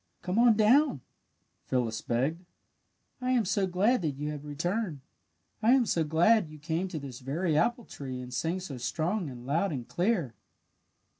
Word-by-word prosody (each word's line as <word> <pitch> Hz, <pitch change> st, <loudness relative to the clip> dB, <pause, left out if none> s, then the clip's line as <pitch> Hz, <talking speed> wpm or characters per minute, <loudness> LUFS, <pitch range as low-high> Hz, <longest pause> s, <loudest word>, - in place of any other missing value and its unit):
"Come 185 Hz, +5 st, 0 dB
on 235 Hz, -3 st, +6 dB
down!" 235 Hz, -, +4 dB, 0.7 s
Phyllis 115 Hz, -4 st, -1 dB
begged. 140 Hz, +9 st, -1 dB, 0.8 s
"I 255 Hz, 0 st, +1 dB
am 235 Hz, -4 st, +2 dB
so 195 Hz, +1 st, +1 dB
glad 200 Hz, +7 st, +2 dB
that 150 Hz, -5 st, -1 dB
you 150 Hz, +1 st, -3 dB
have 150 Hz, -1 st, -6 dB
returned. 165 Hz, +2 st, -2 dB, 0.6 s
I 230 Hz, +3 st, +5 dB
am 260 Hz, -3 st, +4 dB
so 170 Hz, -6 st, +1 dB
glad 170 Hz, +6 st, +3 dB
that -, -, -14 dB
you 155 Hz, -, -10 dB
came 160 Hz, +5 st, -2 dB
to 180 Hz, -4 st, -5 dB
this 140 Hz, -4 st, -7 dB
very 155 Hz, +5 st, -1 dB
apple 240 Hz, +8 st, +1 dB
tree 130 Hz, -2 st, -7 dB
and 125 Hz, 0 st, -8 dB
sang 165 Hz, +8 st, -1 dB
so 150 Hz, -8 st, -6 dB
strong 160 Hz, -, -1 dB
and 120 Hz, -2 st, -10 dB
loud 165 Hz, +8 st, +1 dB
and 130 Hz, -5 st, -5 dB
clear!" 175 Hz, -, 0 dB
165 Hz, 175 wpm, -29 LUFS, 140-205 Hz, 0.8 s, on